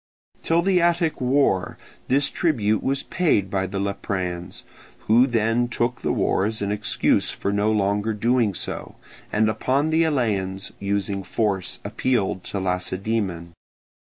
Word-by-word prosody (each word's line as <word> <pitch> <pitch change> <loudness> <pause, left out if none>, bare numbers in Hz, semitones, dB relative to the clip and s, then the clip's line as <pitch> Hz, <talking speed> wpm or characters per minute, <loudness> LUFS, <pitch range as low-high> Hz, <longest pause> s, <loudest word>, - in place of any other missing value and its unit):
Till 165 +1 +2
the 185 -1 +3
Attic 170 -3 +1
war 125 -7 +1 0.3
this 140 +2 +2
tribute 110 - +1
was 135 +1 -1
paid 105 - +1
by 95 -1 0
the 100 +2 -5
Lepreans, 95 -3 -3 0.4
who 120 +4 +4
then 115 0 +1
took 120 +1 -2
the - - 0
war - - +1
as 110 +1 -1
an 100 - -1
excuse 105 0 +1
for 100 - -2
no 105 +2 +2
longer 105 +1 0
doing 115 -2 +1
so, - - -5 0.4
and 110 +1 +2
upon 130 +8 0
the 160 +1 +4
Eleans 100 -11 -1
using 100 0 -1
force 95 -1 -1
appealed 100 -3 0
to 100 - -3
Lacedaemon. 95 -1 -2
105 Hz, 140 wpm, -23 LUFS, 100-130 Hz, 0.4 s, who